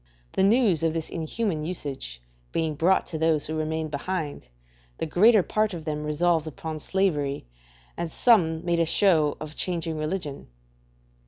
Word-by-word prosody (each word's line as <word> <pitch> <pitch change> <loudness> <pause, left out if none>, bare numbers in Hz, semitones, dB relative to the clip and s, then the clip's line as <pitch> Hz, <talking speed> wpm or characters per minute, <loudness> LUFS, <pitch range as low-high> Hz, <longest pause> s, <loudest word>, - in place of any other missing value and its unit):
The - - +1
news 200 -4 +4
of 165 0 +1
this 160 -1 -3
inhuman 165 0 -2
usage 135 - -5 0.3
being 160 -1 0
brought 170 +6 +2
to 160 - -5
those 160 -2 +2
who 155 - -4
remained 155 0 -2
behind, 150 - -4 0.5
the - - -2
greater 205 +6 +5
part 215 -1 0
of 160 -2 -8
them 150 -1 -3
resolved 160 +1 +1
upon 155 +1 -6
slavery 150 - 0 0.5
and 170 -1 -4
some 170 -10 +3
made 170 -1 +1
a 165 - +3
show 160 -5 +3
of 155 0 -7
changing 165 -3 -2
religion. 155 -2 -4
160 Hz, 155 wpm, -26 LUFS, 155-180 Hz, 0.5 s, greater